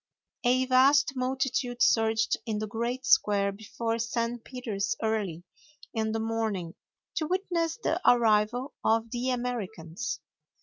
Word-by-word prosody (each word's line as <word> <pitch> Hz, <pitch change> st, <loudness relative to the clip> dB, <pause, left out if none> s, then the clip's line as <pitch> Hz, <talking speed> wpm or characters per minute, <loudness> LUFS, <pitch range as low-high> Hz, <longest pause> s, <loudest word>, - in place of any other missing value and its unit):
A 255 Hz, +1 st, +3 dB
vast 265 Hz, +2 st, +5 dB
multitude 255 Hz, -1 st, 0 dB
surged 225 Hz, 0 st, +3 dB
in 220 Hz, -2 st, -1 dB
the 215 Hz, -, -2 dB
great 235 Hz, +4 st, -3 dB
square 200 Hz, -3 st, +4 dB
before 225 Hz, +3 st, -3 dB
St. 235 Hz, 0 st, -2 dB
Peter's 220 Hz, -6 st, -3 dB
early 205 Hz, -7 st, -1 dB, 0.5 s
in 220 Hz, -1 st, -1 dB
the 225 Hz, -, -1 dB
morning 220 Hz, -6 st, -2 dB, 0.4 s
to 310 Hz, -, 0 dB
witness 350 Hz, -2 st, -1 dB
the 365 Hz, -6 st, -1 dB
arrival 235 Hz, +2 st, +2 dB
of 225 Hz, 0 st, +2 dB
the 245 Hz, +1 st, -1 dB
Americans. 235 Hz, -6 st, -3 dB
230 Hz, 125 wpm, -28 LUFS, 220-255 Hz, 0.5 s, vast